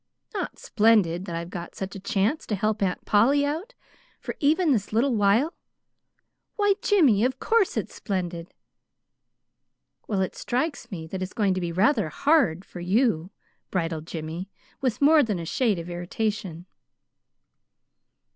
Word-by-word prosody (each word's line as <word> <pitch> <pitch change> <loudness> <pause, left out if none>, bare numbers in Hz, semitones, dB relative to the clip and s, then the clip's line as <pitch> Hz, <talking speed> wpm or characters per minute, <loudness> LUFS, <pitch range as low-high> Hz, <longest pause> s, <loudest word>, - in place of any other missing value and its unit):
"Not 390 -4 -4
splendid 205 -6 +2
that 170 -4 -5
I've 170 +1 -5
got 175 -2 -7
such 190 0 -5
a - - -6
chance 205 +8 0
to 210 - 0
help 215 +2 -1
Aunt 185 -2 -1
Polly 270 +8 +4
out, 335 +13 -4 0.4
for - - -5
even 315 +3 +3
this 210 -6 0
little 240 +5 +2
while? 220 +9 +3 1.0
Why, 410 -1 +3
Jimmy, 285 - +4
of 260 +1 0
course 450 -4 +2
it's - - -3
splendid." 175 -4 -4 1.5
"Well, 200 -3 0
it 190 - -2
strikes 255 -1 -2
me 170 -7 -6
that 185 +4 -6
it's 185 0 -4
going 205 -5 +2
to 185 - -2
be 170 -1 -2
rather 200 - +2
HARD 220 - +2
for 180 - -10
you," 185 -2 +1 0.4
bridled 165 -3 -2
Jimmy, 165 +3 -5 0.3
with 260 0 0
more 305 +1 +7
than 215 -7 0
a 170 - -5
shade 215 +3 +1
of 170 0 -6
irritation. 175 0 -3
205 Hz, 150 wpm, -25 LUFS, 175-260 Hz, 1.5 s, more